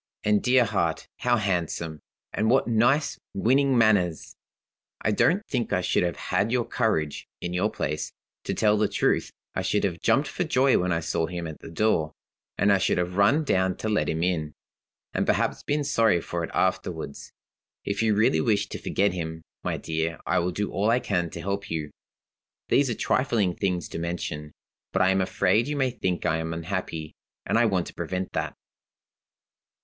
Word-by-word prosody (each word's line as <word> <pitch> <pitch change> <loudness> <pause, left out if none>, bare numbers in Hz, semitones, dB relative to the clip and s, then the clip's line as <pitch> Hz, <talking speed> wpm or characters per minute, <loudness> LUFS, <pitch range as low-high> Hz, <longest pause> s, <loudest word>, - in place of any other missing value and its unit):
'And, 105 -1 +3
dear 125 -1 +4
heart, 85 -8 -1
how 125 -1 +2
handsome, 85 -5 -2 0.3
and 110 +2 +1
what 130 +2 +3
nice, 120 +6 +2 0.2
winning 130 +6 +3
manners! 100 -8 +2 0.6
I 110 - 0
don't 185 - +2
think 125 -4 -2
I 90 - +2
should - - +1
have 85 -2 0
had 105 +3 0
your 120 -2 +1
courage, 80 -11 -1
in 85 - -4
your 90 - +1
place. 75 +2 -3 0.3
To - - -2
tell 105 -1 +3
the 105 - +3
truth, - - +1 0.2
I - - -1
should 105 - 0
have 85 -4 -1
jumped 140 +2 +3
for 160 - -2
joy 135 -4 +3
when 90 0 0
I 85 -1 +1
saw 80 0 -1
him 85 0 -5
at 80 -2 -7
the - - -10
door; 80 -3 +1 0.4
and 100 +1 +4
I 100 - +3
should - - +1
have 90 0 -1
run 110 +11 +4
down 95 - +1
to 110 - -3
let 90 -9 +1
him 80 +1 -1
in 80 -5 -1 0.6
and - - 0
perhaps - - +1
been 145 0 -1
sorry 115 -9 +3
for 85 +1 -4
it - - -4
afterward. 90 -5 -1 0.7
If 100 - -1
you 110 -2 +3
really 100 -7 +3
wish 105 +5 +1
to - - -6
forget 100 -1 +1
him, 80 -2 -5 0.2
my - - -1
dear, 80 0 -2
I - - +2
will 90 +1 0
do 100 +3 -2
all 105 +3 +1
I 120 +2 +4
can 95 -8 -1
to 85 - -7
help 100 +2 -3
you.' 80 -3 -3 0.8
"These 140 -2 +3
are 120 - -1
trifling 110 -9 +1
things 90 -4 -1
to - - -5
mention, 85 -3 -4 0.4
but 95 - +3
I 95 - +4
am 95 0 +2
afraid 100 +4 +2
you 150 - -2
may 130 -3 +1
think 90 -7 -2
I 80 - +2
am 80 0 -3
unhappy 80 -2 -4 0.3
and - - 0
I 115 +1 +5
want 95 -4 +1
to - - -9
prevent 90 +2 -3
that. - - -2
95 Hz, 195 wpm, -26 LUFS, 85-115 Hz, 0.8 s, I